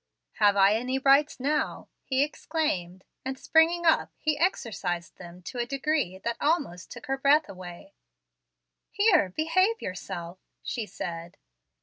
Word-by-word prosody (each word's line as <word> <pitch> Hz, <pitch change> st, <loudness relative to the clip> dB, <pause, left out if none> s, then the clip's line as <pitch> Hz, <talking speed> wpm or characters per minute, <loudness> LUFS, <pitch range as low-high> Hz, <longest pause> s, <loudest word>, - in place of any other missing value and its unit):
"Have 205 Hz, -1 st, +4 dB
I 195 Hz, +1 st, +6 dB
any 250 Hz, +4 st, -1 dB
rights 275 Hz, +2 st, +3 dB
now?" 290 Hz, +4 st, -1 dB, 0.2 s
he 265 Hz, +1 st, +1 dB
exclaimed; 190 Hz, -, -3 dB, 0.2 s
and, 265 Hz, 0 st, -4 dB
springing 330 Hz, +4 st, +3 dB
up, 325 Hz, -, +3 dB
he 310 Hz, -1 st, 0 dB
exercised 200 Hz, -, -2 dB
them 180 Hz, 0 st, -12 dB
to 245 Hz, -, -7 dB
a 240 Hz, -, -1 dB
degree 275 Hz, -, -1 dB
that 235 Hz, +4 st, -3 dB
almost 290 Hz, -, 0 dB
took 295 Hz, -, -10 dB
away 270 Hz, -, 0 dB
her -, -, -1 dB
breath. 240 Hz, -, 0 dB, 1.0 s
"Here, 390 Hz, -, +3 dB
behave 370 Hz, -, +1 dB
yourself," 180 Hz, -1 st, -6 dB, 0.2 s
she 225 Hz, -4 st, -4 dB
said. 170 Hz, -2 st, -7 dB
260 Hz, 135 wpm, -27 LUFS, 185-305 Hz, 1.0 s, I